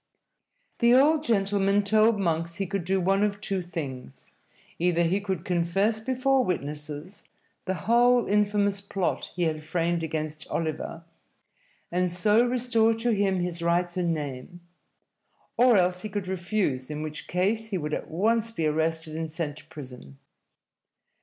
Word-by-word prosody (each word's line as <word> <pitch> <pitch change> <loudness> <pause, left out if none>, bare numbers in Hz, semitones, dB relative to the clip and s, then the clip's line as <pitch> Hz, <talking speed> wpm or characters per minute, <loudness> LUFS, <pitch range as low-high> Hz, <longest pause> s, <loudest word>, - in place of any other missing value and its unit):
The 235 0 +5
old 300 +3 +4
gentleman 200 -4 +2
told 215 +1 +3
Monks 170 -2 -1
he 195 - -2
could 195 -2 -3
do 190 +1 +1
one 195 +2 +2
of 205 -1 0
two 195 -2 -2
things: 140 - -7 0.5
either 170 0 +2
he 185 +4 +1
could 190 -4 -3
confess 190 +5 +1
before 260 +2 +2
witnesses 150 - -5 0.4
the 190 - -1
whole 240 +1 +4
infamous 205 -1 +1
plot 195 -2 -2
he 175 - 0
had 155 -2 -1
framed 170 +2 -1
against 155 -1 -4
Oliver, 165 +1 -3 0.9
and 180 +1 +1
so 210 +6 +3
restore 240 -2 +2
to 235 +2 0
him 195 -3 +1
his 175 -1 -3
rights 175 +1 +1
and 175 -2 0
name, 150 +2 -5 0.9
or 245 -3 +5
else 180 0 +2
he 215 - -5
could 200 -2 -4
refuse, 175 -8 -1
in 150 0 -4
which 155 0 -6
case 205 +5 0
he 195 - -1
would 150 -2 -4
at - - -3
once 225 +7 +1
be 170 -8 -2
arrested 160 +1 -1
and 160 0 -3
sent 155 -3 -4
to - - -12
prison. 125 - -11
180 Hz, 155 wpm, -27 LUFS, 160-210 Hz, 0.9 s, The